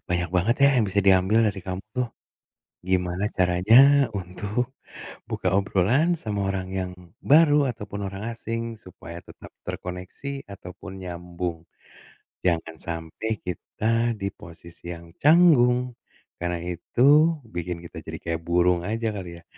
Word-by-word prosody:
banyak 90 Hz, -1 st, 0 dB
banget 110 Hz, +7 st, +3 dB
ya, 140 Hz, -, +8 dB
yang 110 Hz, -, +3 dB
bisa 100 Hz, +1 st, +1 dB
diambil 95 Hz, +4 st, +5 dB
dari 100 Hz, -1 st, -4 dB
kamu 95 Hz, +1 st, -4 dB
tuh. 125 Hz, -2 st, 0 dB, 0.8 s
Gimana 90 Hz, +1 st, 0 dB
caranya 90 Hz, +4 st, +4 dB, 0.4 s
untuk 100 Hz, +7 st, -3 dB, 0.6 s
buka 90 Hz, -, -1 dB
obrolan 100 Hz, -, +2 dB
sama 105 Hz, -2 st, -2 dB
orang 95 Hz, -1 st, -3 dB
yang 90 Hz, 0 st, -4 dB, 0.4 s
baru 150 Hz, -1 st, +7 dB
ataupun 105 Hz, -3 st, -7 dB
orang 100 Hz, +2 st, -7 dB
asing 115 Hz, 0 st, -4 dB, 0.2 s
supaya 85 Hz, -2 st, -10 dB
tetap -, -, -13 dB
terkoneksi 90 Hz, +9 st, -6 dB, 0.3 s
ataupun 90 Hz, 0 st, -10 dB
nyambung. 90 Hz, -1 st, -5 dB, 0.9 s
Jangan 80 Hz, -2 st, 0 dB
sampai 85 Hz, +6 st, -5 dB, 0.2 s
kita 90 Hz, +4 st, -6 dB, 0.4 s
di 100 Hz, -, 0 dB
posisi 85 Hz, 0 st, -13 dB
yang 85 Hz, 0 st, -11 dB, 0.2 s
canggung 145 Hz, -6 st, +6 dB, 0.6 s
karena 85 Hz, 0 st, -1 dB
itu 90 Hz, +7 st, -4 dB, 0.5 s
bikin 85 Hz, 0 st, -3 dB
kita -, -, -10 dB
jadi -, -, -6 dB
kayak 85 Hz, -1 st, -2 dB
burung 90 Hz, 0 st, +3 dB
aja 115 Hz, +1 st, -1 dB
kali 90 Hz, -3 st, -6 dB
ya, 85 Hz, -, -21 dB
95 Hz, 130 wpm, -25 LUFS, 90-110 Hz, 0.9 s, ya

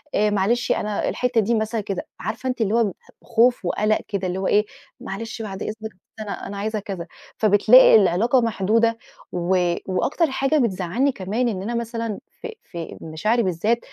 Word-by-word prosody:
آآ 210 Hz, 0 st, +3 dB
معلشي 210 Hz, +5 st, +1 dB
أنا 210 Hz, -1 st, -2 dB
الحتّة 250 Hz, -2 st, +1 dB
دي 230 Hz, +3 st, +1 dB
مثلًا 220 Hz, 0 st, -1 dB
كده، 195 Hz, -2 st, -5 dB
عارفة 225 Hz, +6 st, -4 dB
أنتِ، 250 Hz, -2 st, -3 dB
اللي 210 Hz, 0 st, +1 dB
هو 235 Hz, -, +4 dB
ب 200 Hz, -4 st, -2 dB, 0.3 s
خوف 240 Hz, -2 st, +2 dB
وقلق 215 Hz, +4 st, +1 dB
كده، 195 Hz, -3 st, -2 dB
اللي 180 Hz, +1 st, -3 dB
هو 190 Hz, -, -1 dB
إيه، 210 Hz, +1 st, +3 dB, 0.3 s
معلش 225 Hz, 0 st, -6 dB
بعد 195 Hz, -3 st, -6 dB
إذنك، 215 Hz, -, -4 dB, 0.2 s
بس 185 Hz, -, -35 dB, 0.3 s
أنا 205 Hz, -, -6 dB
أنا 200 Hz, -, -6 dB
عايزة 215 Hz, +1 st, -2 dB
كذا، 190 Hz, -4 st, -6 dB, 0.3 s
فبتلاقي 215 Hz, +5 st, +7 dB
العلاقة 220 Hz, +6 st, +4 dB
محدودة، 230 Hz, +1 st, +1 dB, 0.3 s
و 180 Hz, +1 st, +1 dB, 0.2 s
واكتر 265 Hz, -, 0 dB
حاجة 270 Hz, +3 st, +1 dB
بتزعلني 230 Hz, -, +1 dB
كمان 215 Hz, +5 st, -2 dB
إن 195 Hz, -5 st, -2 dB
أنا 235 Hz, +4 st, -3 dB
مثلًا 230 Hz, -2 st, -3 dB, 0.2 s
في 455 Hz, -1 st, -7 dB
في 170 Hz, -1 st, -8 dB
مشاعري، 215 Hz, +9 st, 0 dB
بالذات 200 Hz, +6 st, 0 dB
215 Hz, 175 wpm, -22 LUFS, 195-235 Hz, 0.3 s, فبتلاقي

